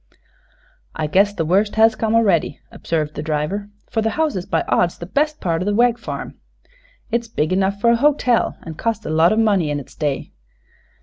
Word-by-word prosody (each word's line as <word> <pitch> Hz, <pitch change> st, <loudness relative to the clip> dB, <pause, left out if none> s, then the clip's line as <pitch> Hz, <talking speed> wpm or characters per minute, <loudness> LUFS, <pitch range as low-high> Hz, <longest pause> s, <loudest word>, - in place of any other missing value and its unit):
"I 155 Hz, -, -2 dB
guess 195 Hz, +7 st, +3 dB
the 165 Hz, -5 st, -3 dB
worst 200 Hz, +6 st, +1 dB
has 225 Hz, 0 st, +5 dB
come 220 Hz, 0 st, 0 dB
a'ready," 195 Hz, -10 st, +2 dB
observed 155 Hz, -2 st, -3 dB
the -, -, -5 dB
driver; 160 Hz, +7 st, -2 dB, 0.2 s
"for 225 Hz, -, 0 dB
the 220 Hz, -, +1 dB
house 315 Hz, -2 st, +1 dB
is 185 Hz, -1 st, -4 dB
by -, -, 0 dB
odds 175 Hz, -1 st, +1 dB
the 170 Hz, -, -7 dB
best 300 Hz, -, -1 dB
part 165 Hz, -2 st, -1 dB
o' -, -, -2 dB
the 205 Hz, 0 st, 0 dB
Wegg 240 Hz, +1 st, +3 dB
farm. -, -, -7 dB, 0.7 s
It's 235 Hz, 0 st, -1 dB
big 155 Hz, -6 st, -1 dB
enough 195 Hz, +1 st, 0 dB
fer 235 Hz, +3 st, +4 dB
a -, -, +4 dB
hotel, 255 Hz, -3 st, +2 dB
an' 165 Hz, -, -7 dB
cost 220 Hz, +5 st, -3 dB
a -, -, -3 dB
lot 160 Hz, +2 st, +4 dB
o' 215 Hz, -, +1 dB
money 200 Hz, -8 st, +2 dB
in 145 Hz, 0 st, -1 dB
its 135 Hz, -, -12 dB
day. 145 Hz, -3 st, -3 dB
200 Hz, 205 wpm, -20 LUFS, 165-225 Hz, 0.7 s, has